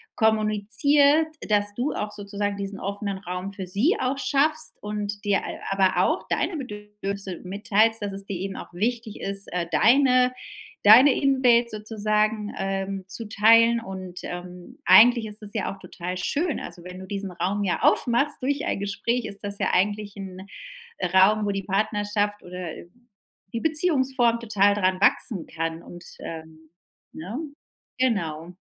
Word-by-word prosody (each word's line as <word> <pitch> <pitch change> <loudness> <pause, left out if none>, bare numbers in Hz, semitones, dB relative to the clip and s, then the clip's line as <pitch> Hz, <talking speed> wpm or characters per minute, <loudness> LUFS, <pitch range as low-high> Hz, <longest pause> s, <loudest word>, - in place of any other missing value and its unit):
kommuniziert, 220 +8 +3 0.2
dass 205 -1 +1
du 250 +7 -1
auch 210 0 -3
sozusagen 205 0 -3
diesen 200 0 -6
offenen 200 0 -3
Raum 180 +1 -5
für 195 -1 -6
sie 225 - +1
auch 265 +2 -1
schaffst 310 +3 0
und 210 0 -4
dir 200 -1 +2
al - - -6
aber 195 -1 +3
auch - - -1
deine 360 - 0
Bedürfnisse 210 - -6
mitteilst, 215 +4 +1
dass 205 -1 -4
es 195 0 -6
dir 200 - -5
eben 195 +1 -4
auch - - -9
wichtig 230 +2 -2
ist, 195 0 -4
äh, 175 -1 -1
deine 250 - +4 0.5
deine 250 +7 +9
Invade 255 -4 +3
sozusagen, 215 0 -1
ähm, 195 0 -3
zu 205 +3 -5
teilen. 230 +2 +5
Und, 185 -5 -8
ähm, 180 0 -8
eigentlich 230 +3 +7
ist 210 +1 -10
es 205 - -8
ja 215 -3 -2
auch 195 - -15
total 180 -1 -6
schön. 300 - -1
Also, 175 - -9
wenn 180 +1 -9
du 190 - -8
diesen 195 -1 -5
Raum 195 +3 -2
ja 185 -3 -1
aufmachst 255 +4 +2
durch 280 +2 -1
ein 200 - -2
Gespräch, 235 +5 -1
ist 200 -2 -7
das 200 0 -5
ja 195 - +1
eigentlich 205 +2 0
'n 190 -1 -8 0.7
Raum, 205 +3 +5
wo 205 - 0
die 195 0 -3
Partnerschaft 205 +1 -1
oder, 180 -1 -6
äh, - - -12 0.7
die 230 - -2
Beziehungsform 265 -7 +2
total 205 -3 +3
dran 185 -2 +1
wachsen 200 -2 +1
kann 165 0 -4
und, 175 0 -11 0.2
ähm, 160 -1 -9 0.4
ne? 185 +10 -6 0.6
Genau. 175 -10 -1
205 Hz, 155 wpm, -25 LUFS, 190-230 Hz, 0.7 s, deine